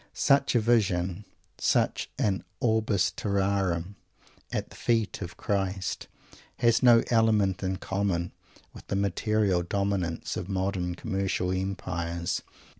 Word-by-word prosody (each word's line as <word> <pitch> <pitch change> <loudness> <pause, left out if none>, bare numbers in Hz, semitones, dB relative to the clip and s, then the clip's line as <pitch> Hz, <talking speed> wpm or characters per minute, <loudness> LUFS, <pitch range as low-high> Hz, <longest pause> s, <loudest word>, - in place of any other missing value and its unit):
Such 140 -1 +3
a - - +6
vision, 100 -4 +1 0.3
such - - +1
an 95 -2 0 0.2
Orbis 110 -5 +2
Terrarum 100 -2 -1 0.5
at - - -3
the - - -12
feet 115 -4 0
of 90 -2 -6
Christ, 95 -2 -2 0.5
has 115 -2 +3
no 120 -2 +7
element 110 -5 +3
in 95 0 -1
common 95 -4 -1 0.4
with - - -13
the - - -2
material 100 0 +1
dominance 95 -2 -1
of 90 +1 -5
modern 95 -2 -1
commercial 95 -4 -1
empires. 90 -3 -2
100 Hz, 115 wpm, -28 LUFS, 90-110 Hz, 0.5 s, no